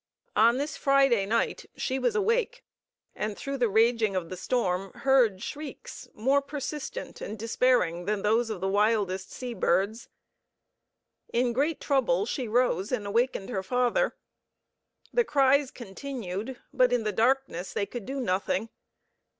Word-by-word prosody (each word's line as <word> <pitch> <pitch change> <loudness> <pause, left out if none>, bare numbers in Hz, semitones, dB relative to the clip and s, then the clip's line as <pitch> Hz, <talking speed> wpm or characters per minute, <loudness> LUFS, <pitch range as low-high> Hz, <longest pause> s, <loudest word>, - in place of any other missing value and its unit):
On 230 +3 +5
this 290 +3 -3
Friday 270 -7 +3
night 230 +2 0
she 260 +1 -2
was 465 - +1
awake, 465 +3 0 0.5
and 210 -1 -3
through 275 0 -4
the 240 -2 +3
raging 220 -1 +3
of 175 -3 -2
the 185 - -5
storm 190 -2 -1
heard 245 -8 +3
shrieks 295 0 -7
more 270 +6 +2
persistent 295 - -6
and 215 - -5
despairing 225 -6 +1
than 210 0 -1
those 225 +2 +2
of 210 -5 -4
the 190 - 0
wildest 200 -2 +1
sea 250 -1 -5
birds. 205 +3 0 1.2
In 240 0 +1
great 290 +6 0
trouble 235 - +1
she 245 +1 -3
rose 215 -5 +1
and 230 -5 -1
awakened 220 -1 0
her 195 -6 -2
father. 250 - +1 1.0
The 480 - +4
cries 280 - +3
continued, 240 -1 -6
but 250 -1 +4
in 245 -2 +1
the 215 - 0
darkness 225 -5 0
they 200 - -1
could 235 -1 -7
do 270 +1 -3
nothing. 200 0 -1
235 Hz, 145 wpm, -28 LUFS, 200-270 Hz, 1.2 s, On